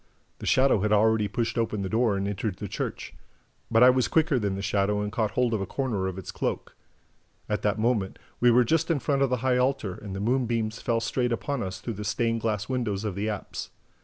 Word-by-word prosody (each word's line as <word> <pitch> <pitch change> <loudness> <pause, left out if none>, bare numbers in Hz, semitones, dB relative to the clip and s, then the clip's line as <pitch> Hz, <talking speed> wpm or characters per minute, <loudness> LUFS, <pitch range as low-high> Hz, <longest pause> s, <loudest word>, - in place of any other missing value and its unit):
The - - -6
shadow 130 -4 +4
had 105 +2 0
already 105 0 +3
pushed 115 +3 -2
open 110 -3 -1
the - - -2
door 110 0 +1
and 100 0 -1
entered 100 -1 -2
the - - -5
church. - - -5 0.6
But 115 +1 +5
I 125 - +9
was 130 -1 +1
quicker 155 -4 +2
than 100 -3 -1
the 100 - -5
shadow 100 +1 +1
and 105 0 -2
caught 110 -1 0
hold 125 -2 +2
of 110 - 0
a 95 - -3
corner 115 -9 -1
of 95 -1 -5
its 95 - -6
cloak. - - -3 0.7
At - - -1
that - - +1
moment, 110 -4 0 0.2
we 120 - +5
were 120 +1 +5
just 160 +7 +1
in 165 - +2
front 140 +2 0
of 135 - +3
the 125 - +1
high 125 -1 +3
altar; 125 -6 0
and 95 +1 -8
the - - -4
moonbeams 115 -1 0
fell 115 -1 0
straight 120 +2 0
upon 140 +3 -2
us 95 -3 -4
through 115 - -4
the 105 0 -6
stained 115 +2 0
glass 105 -2 -1
windows 115 -6 -2
of 105 -3 -2
the 100 +3 -2
apse. 105 -2 -5
115 Hz, 235 wpm, -27 LUFS, 105-125 Hz, 0.7 s, I